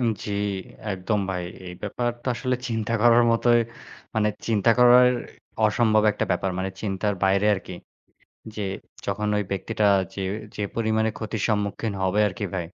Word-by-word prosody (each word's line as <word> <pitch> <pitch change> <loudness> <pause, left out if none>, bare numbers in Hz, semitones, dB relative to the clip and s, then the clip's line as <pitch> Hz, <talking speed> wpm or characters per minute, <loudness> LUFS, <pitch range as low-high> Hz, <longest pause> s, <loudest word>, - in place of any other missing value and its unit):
উ - - -1 0.2
জ্বি, 105 - -4 0.6
একদম 95 +3 -1
ভাই। 90 -1 -3 0.2
এই 90 - -7
ব্যাপার 120 +4 -1
তো - - -15
আসলে 125 +2 -1
চিন্তা 115 -1 -2
করার 120 0 +6
মতোই, 120 +1 +4 0.5
মানে 110 -1 +2 0.2
চিন্তা 110 -1 +3
করার 125 0 +7 0.6
অসম্ভব 110 0 +3
একটা - - -1
ব্যাপার। 95 - 0
মানে 95 +1 -2
চিন্তার 100 0 -1
বাইরে 95 +2 +3
আরকি। 95 -1 -7 0.8
যে 105 - -4 0.4
যখন 105 +1 -2
ওই 105 - 0
ব্যক্তিটা 105 +2 0 0.3
যে 100 - -5 0.3
যে - - -4
পরিমাণে 110 -1 +1
ক্ষতির 110 -1 -4
সম্মুখীন 105 0 -1
হবে 95 +3 +1
আরকি 100 +2 -4
ভাই। 90 -3 -2
105 Hz, 155 wpm, -24 LUFS, 100-115 Hz, 0.8 s, করার